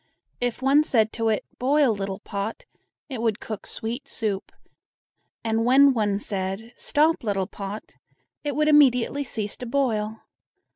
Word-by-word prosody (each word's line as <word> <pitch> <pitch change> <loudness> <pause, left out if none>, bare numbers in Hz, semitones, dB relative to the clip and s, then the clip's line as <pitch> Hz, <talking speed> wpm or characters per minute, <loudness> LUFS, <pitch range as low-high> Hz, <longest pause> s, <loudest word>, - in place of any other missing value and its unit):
If 245 +1 -2
one 275 +3 +5
said 220 -7 +2
to 225 -1 0
it, 215 - 0
"Boil, 275 -1 +3
little 195 -1 -4
pot!" 205 - -5 0.4
it 260 -6 -5
would 225 -2 0
cook 215 -3 -7
sweet 235 +5 -5
soup; 205 -4 -3 0.9
and 225 0 +1
when 270 +3 +6
one 210 -4 +1
said: 200 +3 -4
"Stop, 310 +1 +2
little 200 -3 0
pot!" 200 +2 -7 0.5
it 290 -2 -2
would 305 +1 +2
immediately 285 -2 +4
cease 215 -6 -4
to 250 - -6
boil. 225 -5 0
225 Hz, 145 wpm, -25 LUFS, 210-270 Hz, 0.9 s, when